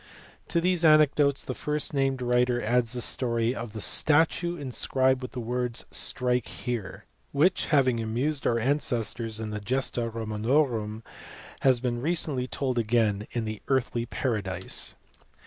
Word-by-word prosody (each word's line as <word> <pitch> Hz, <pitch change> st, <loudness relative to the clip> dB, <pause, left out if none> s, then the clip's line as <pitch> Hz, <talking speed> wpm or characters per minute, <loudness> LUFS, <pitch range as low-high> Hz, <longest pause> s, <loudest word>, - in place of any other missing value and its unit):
To 170 Hz, -, +1 dB
these 180 Hz, 0 st, +1 dB
anecdotes 150 Hz, -3 st, +4 dB
the 130 Hz, -, -4 dB
first 150 Hz, +3 st, -3 dB
named 135 Hz, -2 st, 0 dB
writer 125 Hz, 0 st, +2 dB
adds 120 Hz, +1 st, +1 dB
the 125 Hz, -, -1 dB
story 115 Hz, -1 st, +1 dB
of 115 Hz, -3 st, -6 dB
the 110 Hz, 0 st, -7 dB
statue 165 Hz, -, +2 dB
inscribed 130 Hz, -1 st, 0 dB
with 125 Hz, -, -7 dB
the 125 Hz, -, -4 dB
words 125 Hz, 0 st, -2 dB
" -, -, -35 dB, 0.2 s
strike 125 Hz, -1 st, 0 dB
here," 120 Hz, -7 st, -5 dB, 0.3 s
which 170 Hz, +6 st, +2 dB
having 130 Hz, -6 st, +3 dB
amused 125 Hz, +7 st, -1 dB
our 115 Hz, -, +2 dB
ancestors 115 Hz, -4 st, 0 dB
in 110 Hz, -1 st, -4 dB
the 105 Hz, -, -3 dB
Gesta 120 Hz, +1 st, -2 dB
Romanorum 110 Hz, 0 st, -1 dB, 0.6 s
has 130 Hz, -2 st, +3 dB
been 120 Hz, -1 st, -2 dB
recently 150 Hz, -4 st, 0 dB
told 130 Hz, -2 st, -1 dB
again 110 Hz, -2 st, +1 dB
in 120 Hz, -2 st, -2 dB
the 110 Hz, -1 st, -5 dB
Earthly 120 Hz, -3 st, 0 dB
Paradise. 100 Hz, -7 st, -3 dB
125 Hz, 145 wpm, -27 LUFS, 115-140 Hz, 0.6 s, anecdotes